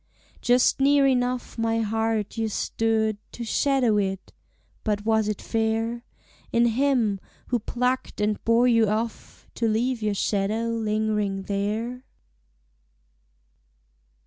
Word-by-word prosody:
Just 245 +2 +3
near 280 +1 +4
enough 250 -2 0
my 225 0 +1
heart 220 -1 -1
you 225 -1 -1
stood 220 0 0
To 240 - -6
shadow 255 -3 +2
it, 195 -2 -2 0.5
but 210 -1 -1
was 220 -1 +2
it 210 -2 -2
fair 225 +1 -1 0.5
In 235 0 +3
him, 235 -4 +2 0.3
who 245 - +1
plucked 250 +3 -2
and 210 0 0
bore 230 +2 +4
you 230 -2 +4
off, 220 +1 -4
To 230 - 0
leave 230 +2 0
your 210 -1 0
shadow 210 +4 0
lingering 215 -3 -1
there? 215 +6 -2
225 Hz, 120 wpm, -25 LUFS, 215-240 Hz, 0.5 s, near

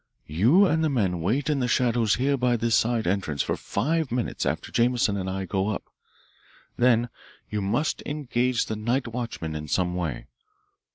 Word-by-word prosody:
You 120 - +4
and 160 -3 +1
the 155 - +2
men 95 - 0
wait 120 - 0
in 150 -2 +1
the 125 - 0
shadow 120 -1 +2
here 130 +7 +2
by 125 -2 +1
this 115 0 0
side 115 0 +2
entrance 85 -6 0
for - - -1
five 160 -1 -1
minutes 120 -1 -2
after - - -3
Jameson 120 -3 +2
and 95 -1 -3
I 95 0 -3
go 95 +1 -1
up. 105 - -2 0.9
Then 120 -1 +3 0.4
you 105 -1 -1
must 105 +11 0
engage 125 -4 0
the 110 - -3
night 120 +5 -1
watchman 115 -9 -4
in 75 0 -5
some 90 +3 0
way. 85 -8 -3
115 Hz, 175 wpm, -25 LUFS, 95-125 Hz, 0.9 s, You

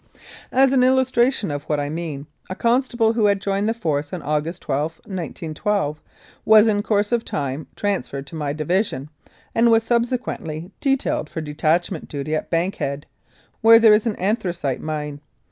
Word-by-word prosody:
As 265 +1 +4
an 265 -2 +4
illustration 255 - +2
of 145 0 -3
what 150 -1 -1
I 145 - -2
mean, 155 -4 -5 0.2
a 185 - -4
constable 235 -1 +2
who 220 -2 +3
had 200 -1 +2
joined 200 +2 0
the - - +1
Force 150 -8 -2
on 180 -4 -5
August 155 +4 -2
12, 150 +3 -1
1912, 165 -2 -3 0.4
was 215 0 +7
in 210 -2 +2
course 205 0 0
of 235 -1 +1
time 140 +1 -4
transferred 140 -9 -2
to 165 - -10
my 150 -2 -2
division, 155 -2 -1 0.4
and 235 +1 +4
was 225 0 +4
subse 240 +1 +2
quently 160 -7 -6
detailed 270 - 0
for - - -5
detachment 155 +3 -1
duty 145 +1 -4
at 155 - -2
Bankhead, 165 -5 -1 0.6
where 230 +1 +8
there 225 -2 +7
is 210 +2 +2
an 215 - -1
anthracite 180 - -1
mine. 150 -2 -4
180 Hz, 165 wpm, -22 LUFS, 150-225 Hz, 0.6 s, where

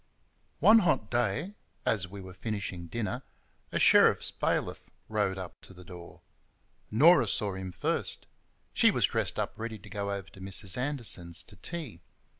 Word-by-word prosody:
One 225 +1 +8
hot 145 - +1
day, 120 - 0 0.3
as 100 -5 +1
we 100 +2 -9
were 95 0 -10
finishing 95 -3 -4
dinner, 115 +6 -3 0.5
a - - 0
sheriff's - - +6
bailiff - - -2 0.2
rode 105 -3 0
up 95 -2 -8
to 95 - -14
the 90 0 -13
door. 85 -1 -11 0.7
Norah 145 +3 +6
saw 100 0 0
him 95 -1 -5
first. - - -2 0.5
She - - +5
was - - +3
dressed - - -1
up - - -1
ready 110 0 -5
to 95 - -14
go 100 -1 -3
over 100 -1 -4
to 95 - -14
Mrs. 95 0 -3
Anderson's 120 - -2
to 105 - -15
tea. 125 - -7
100 Hz, 160 wpm, -30 LUFS, 95-120 Hz, 0.7 s, One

